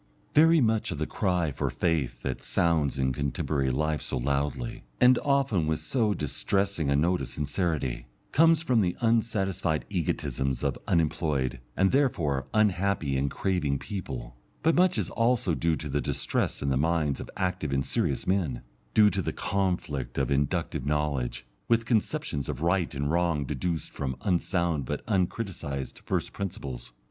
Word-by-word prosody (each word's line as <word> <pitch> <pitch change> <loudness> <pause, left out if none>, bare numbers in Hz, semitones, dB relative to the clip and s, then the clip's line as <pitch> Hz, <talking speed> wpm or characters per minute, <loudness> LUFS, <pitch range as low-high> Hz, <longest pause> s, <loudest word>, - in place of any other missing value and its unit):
Very 160 +1 +6
much 110 -2 +2
of - - -3
the 80 - -1
cry 90 -6 0
for 65 - -2
faith 70 -8 -1
that 65 - -3
sounds 80 -4 +1
in 65 -1 +1
contemporary 70 0 -1
life 75 +4 0
so - - -2
loudly, 70 -1 -2 0.2
and 125 0 +6
often 135 - +1
with 80 0 0
so 110 -6 0
distressing 85 +1 -1
a 70 - +3
note 85 +5 +2
of - - -3
sincerity, 70 -5 -2 0.2
comes 165 +1 +5
from 125 -8 +3
the 90 -3 0
unsatisfied 100 -8 +1
egotisms 70 -7 -1
of - - +1
unemployed, 75 -6 +1 0.2
and, 95 0 +4
therefore, 80 - +1
unhappy 100 -8 +1
and 70 +1 +1
craving 75 -4 0
people; 65 - -6 0.3
but 165 +1 +4
much 180 +1 +3
is - - -1
also 115 -6 +2
due 80 0 +1
to 75 - -5
the 75 +1 -1
distress - - -1
in 70 - 0
the 65 - +2
minds 75 -1 +1
of - - -7
active 90 -6 -1
and 70 0 0
serious - - 0
men, 85 -11 0 0.3
due 105 -1 +7
to 95 - -1
the - - -2
conflict 90 -10 -2
of 65 -1 0
inductive 70 -2 0
knowledge, 70 -4 -1 0.2
with 115 -1 +3
conceptions 105 - -1
of - - -4
right 85 -2 +1
and 70 +2 -1
wrong 85 -4 +1
deduced 80 +4 -3
from 65 -2 -3
unsound, 85 -4 +1
but 75 +4 -4
uncriticised, 90 - -2
first - - -1
principles. 70 -12 -5
80 Hz, 160 wpm, -28 LUFS, 70-100 Hz, 0.3 s, due